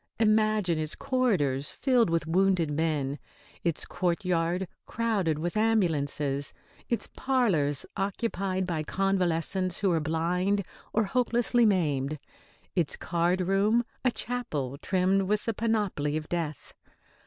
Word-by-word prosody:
Imagine 215 -6 +3
its 155 0 -3
corridors 190 - 0
filled 250 -6 +2
with 165 -1 0
wounded 180 -1 +2
men, 150 -2 -1 0.4
its 170 -3 -1
courtyard 175 0 0 0.2
crowded 205 -9 0
with 170 +4 -3
ambulances, 150 -10 +1 0.4
its 235 - 0
parlours 185 - +1
occupied 195 -2 -1
by 170 -3 -2
convalescents 185 0 0
who 195 -2 +2
are 165 - +2
blind 175 +6 0 0.3
or 220 - +2
hopelessly 240 +1 +2
maimed, 150 -7 +1 0.6
its 170 -5 0
card 175 +2 0
room 200 +6 +2 0.2
a 255 - +4
chapel 190 - -3
trimmed 190 +1 +2
with 205 +2 0
the 230 - 0
panoply 205 -10 0
of 155 0 -5
death. 165 -4 -4
185 Hz, 120 wpm, -28 LUFS, 160-215 Hz, 0.6 s, a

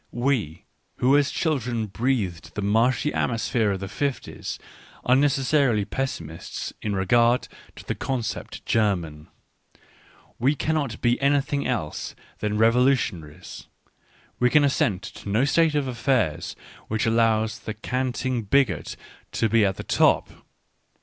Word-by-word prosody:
We 120 - -1 0.3
who 130 +3 +3
as 145 -1 +3
chil 155 -4 0
dren 120 -2 -2
breathed 95 -6 -2
the 105 - -3
marshy 115 +7 +2
atmosphere 115 -1 0
of 95 - -5
the 95 - -4
fifties, 135 +7 -4 0.5
are 125 - +5
necessarily 135 -5 +2
pessimists 85 - -5
in 105 -2 -2
regard 120 +6 +3 0.3
to - - -12
the - - -1
concept 125 -4 -4
"German"; 85 -9 0 1.1
we 135 +5 +2
cannot 145 -7 -2
be 120 +2 +2
anything 140 0 +1
else 115 -12 -3 0.2
than 105 0 -1
revolu 125 +5 +5
tionaries 80 - -7 0.3
— - - -33
we 125 - +4
can 150 +3 +5
assent 105 -9 +1
to 105 - -9
no 110 +7 +2
state 160 +2 +3
of 145 -2 0
affairs 125 - 0 0.3
which 110 0 -1
allows 110 -1 +2
the 110 - -6
canting 130 +2 -2
bigot 120 -1 +1 0.4
to 115 - +1
be 115 0 +4
at 95 -2 +1
the - - -5
top. - - +2
115 Hz, 135 wpm, -24 LUFS, 105-135 Hz, 1.1 s, are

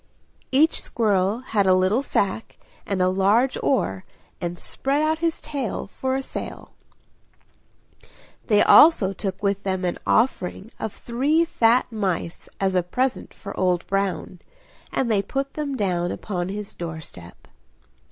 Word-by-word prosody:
Each 300 +5 +4
squirrel 205 0 +1
had 210 -6 0
a 185 - +6
little 185 +7 +2
sack 220 -5 -1 0.3
and 190 -2 0
a - - +3
large 200 +7 +3
oar, 220 -8 0 0.4
and 175 0 -3
spread 275 +10 -1
out 315 +1 +1
his 330 -1 0
tail 280 -8 -4
for 260 +6 -3
a 270 - -2
sail. - - -7 1.8
They 210 -3 +5
also 260 - +7
took 195 0 -5
with 200 0 +1
them 190 -2 -2
an 175 - -2
offering 220 -2 0
of 220 - -3
three 280 +11 +1
fat 245 -5 +2
mice 190 -6 -3
as 195 -1 +1
a 180 - +3
present 250 +9 -2
for 200 - -9
Old 180 -2 +1
Brown, 195 -2 -2 0.5
and 215 -6 0
put 275 0 -3
them 285 -3 -3
down 175 -4 0
upon 180 -3 -4
his 205 +1 -5
door 165 -2 -6
step. 90 - -12
200 Hz, 140 wpm, -23 LUFS, 185-260 Hz, 1.8 s, also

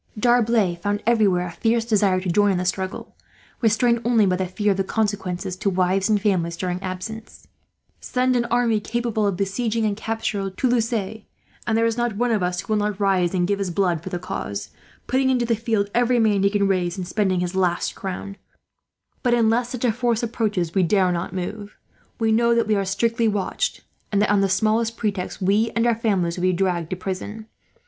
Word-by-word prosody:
D'Arblay 230 -5 +3
found 205 +1 -1
everywhere 205 -6 +3
a 175 - -6
fierce 225 +7 0
desire 205 -4 +2
to 185 -2 -1
join 205 +3 +3
in - - 0
the 180 - -2
struggle, 190 +1 -3 0.5
restrained 235 +1 +2
only 230 -3 +3
by 185 -1 +2
the 185 0 -2
fear 205 +3 0
of 195 - 0
the 195 - +1
consequences 190 -3 -2
to 200 - 0
wives 185 +2 +1
and 210 -1 +3
families, 175 -5 0
during 180 0 -3
absence. 195 +4 -7 0.5
"Send 255 0 0
an 240 -1 +1
army 235 -2 +1
capable 225 -1 -1
of 195 -3 -1
besieging 220 +3 -1
and 210 -1 0
capturing 215 -3 -3
Toulouse, 240 +2 +1
and 220 +1 -4
there 230 - +3
is 230 0 0
not 240 -4 -1
one 240 +1 +1
of 215 -3 +1
us 180 0 -1
who 215 - -3
will 210 - +2
not 210 -1 -2
rise 190 -3 +2
and 175 -1 +1
give 200 0 0
his 195 -2 -1
blood 175 -2 0
for - - -7
the 180 - -3
cause, 175 - -5 0.3
putting 260 +1 +1
into 250 -2 +2
the 230 0 +1
field 215 -2 -1
every 245 +1 +2
man 215 -4 +3
he 200 - +4
can 200 -1 +1
raise, 180 -1 0
and 180 -2 -4
spending 190 -2 0
his 180 0 -2
last 180 -2 0
crown; 195 +1 -6 0.8
but 245 -2 +2
unless 235 +1 +2
such 250 -1 -3
a 240 - +3
force 235 0 0
approaches, 210 -7 -1
we 190 - +3
dare 185 +1 +3
not 175 +1 -3
move. 200 +3 -6 0.4
We 225 -2 +1
know 235 +1 +3
that 235 - +2
we 215 - +1
are 200 -1 0
strictly 230 +4 +1
watched 205 -3 -1 0.3
and 200 - +2
that, 210 - +1
on 205 -1 +3
the 195 - +2
smallest 220 +4 +1
pretext, 200 -3 -3
we 210 +4 +2
and 230 0 +2
our 240 - +4
families 195 -7 0
would - - -4
be 185 0 +2
dragged 175 -3 -1
to - - -2
prison. 195 +4 -5
205 Hz, 210 wpm, -22 LUFS, 185-230 Hz, 0.8 s, he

